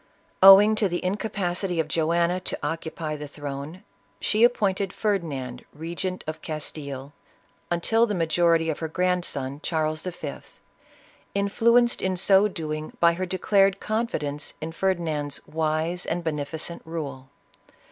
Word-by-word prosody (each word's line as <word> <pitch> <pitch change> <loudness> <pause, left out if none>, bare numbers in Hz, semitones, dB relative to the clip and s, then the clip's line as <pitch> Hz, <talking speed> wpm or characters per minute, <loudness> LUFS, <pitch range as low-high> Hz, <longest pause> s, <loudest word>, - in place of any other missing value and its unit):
Owing 195 +3 +10
to 205 -3 +2
the 175 +1 -3
incapacity 185 -3 -1
of 160 - +1
Joanna 170 +3 +1
to 185 - -4
occupy 160 0 -3
the 150 0 -7
throne, 145 +4 -7 0.4
she 215 +2 +2
appointed 200 -5 +2
Ferdinand 145 - -2
regent 170 +4 -4
of 155 0 -5
Castile 145 -3 -6 0.6
"until 225 +7 +2
the 210 - -1
majority 165 -1 +2
of 150 - -6
her 160 - -2
grandson, 160 -6 -1
Charles 155 -2 -1
V., 180 -1 -5 1.0
influenced 235 +4 +3
in 190 -1 0
so 195 +2 +5
doing 155 -5 -5
by 170 0 +5
her 185 +2 -3
declared 195 +1 +2
confidence 150 -11 -3
in 160 +1 -5
Ferdinand's 160 -6 -1
" - - -32
wise 160 +3 -1
and 175 +1 -2
beneficent 160 +2 -4
rule." 140 -5 -6
170 Hz, 130 wpm, -25 LUFS, 155-190 Hz, 1.0 s, Owing